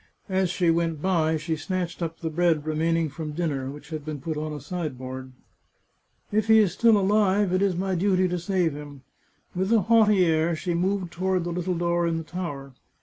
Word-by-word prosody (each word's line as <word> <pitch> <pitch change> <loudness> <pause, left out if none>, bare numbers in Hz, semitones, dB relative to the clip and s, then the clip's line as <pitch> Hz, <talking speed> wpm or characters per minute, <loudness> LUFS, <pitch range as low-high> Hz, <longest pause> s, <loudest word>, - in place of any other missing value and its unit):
As 190 -1 +1
she 175 -1 +2
went 165 -2 0
by 160 -2 +1
she 160 +1 -2
snatched 175 +2 -4
up 165 -1 -4
the 160 -1 -3
bread 165 -2 +1
remaining 165 +1 +1
from 150 +1 -6
dinner, 145 -5 -2
which 150 +2 -10
had 155 -2 -5
been 150 -1 -5
put 160 +4 -4
on 155 +1 -3
a 150 - -5
sideboard. 130 -5 -6 0.5
" - - -42
If 215 +1 +1
he 220 0 +7
is 205 -5 +4
still 225 +1 +4
alive, 200 -1 +2
it 185 - +2
is 195 -3 +2
my 190 +2 -1
duty 185 +1 +2
to 180 0 -2
save 175 -3 0
him." 145 -2 -10 0.5
With 190 +3 -1
a 225 -2 +5
haughty 210 -3 +4
air 160 0 +2
she 175 +2 -3
moved 185 +1 -1
toward 185 0 0
the 175 - -3
little 180 +1 -2
door 170 0 +1
in 165 -1 0
the 165 - -4
tower. 145 -6 -6
170 Hz, 205 wpm, -25 LUFS, 155-185 Hz, 0.5 s, he